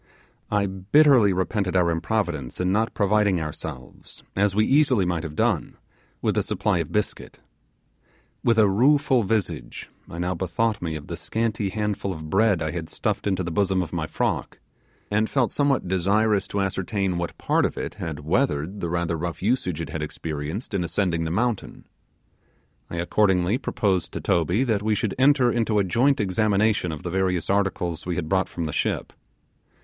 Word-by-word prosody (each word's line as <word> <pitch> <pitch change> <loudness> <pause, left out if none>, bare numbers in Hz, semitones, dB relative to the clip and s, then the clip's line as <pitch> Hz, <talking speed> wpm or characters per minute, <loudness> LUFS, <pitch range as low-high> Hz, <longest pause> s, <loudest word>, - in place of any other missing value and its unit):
I 105 -1 +1
bitterly 105 +5 +4
repented 95 +1 -1
our 90 -2 +3
improvidence 85 - -2
in 90 0 +1
not 110 +3 0
providing 100 -3 +2
ourselves, 75 -4 -8
as 100 0 +2
we 110 +1 +3
easily 135 -8 +3
might 85 -2 -1
have 80 -2 -7
done, - - 0 0.5
with - - +1
a - - +2
supply - - 0
of - - -3
biscuits. - - -3 1.1
With 115 -1 +3
a 110 -2 +6
rueful 130 +5 +3
visage 95 - -3 0.2
I 85 - -8
now 90 +1 -1
bethought 100 +5 -1
me 80 -2 -3
of 75 - -7
the - - -5
scanty 110 -3 -2
handful 105 -1 -2
of 80 -2 -8
bread 100 -4 +3
I 80 - -2
had 80 -1 -5
stuffed - - -2
into 95 -2 0
the 85 - -4
bosom 95 +1 +1
of 80 - -9
my 80 -3 -2
frock, - - -2 0.5
and 110 +2 +1
felt 130 -5 +1
somewhat 140 -8 +1
desirous 100 +3 +2
to 100 - -2
ascertain 95 -1 -1
what 85 - -4
part - - +1
of - - -1
it - - -4
had 80 -3 -4
weathered 90 - 0
the 85 - -3
rather 85 0 -1
rough 85 +1 -4
usage 95 -8 0
it 80 - -6
had 80 - -4
experienced 75 - -5
in 95 -3 0
ascending 85 -1 0
the - - -2
mountain. 110 +5 -2 1.0
I - - -6
accordingly 90 +4 +2
proposed 100 - -1
to - - -3
Toby 90 - +1
that 110 -6 0
we 110 0 +1
should 105 0 -1
enter 130 -2 +5
into 115 -2 +1
a 100 - +4
joint 125 +10 +2
examination 105 -1 +1
of 75 - -7
the 90 - -4
various 90 -2 0
articles 95 -4 -1
we 90 - -1
had 85 -3 -3
brought 95 +3 +1
from 85 - -4
the 75 - -4
ship. - - -1
95 Hz, 180 wpm, -24 LUFS, 85-110 Hz, 1.1 s, a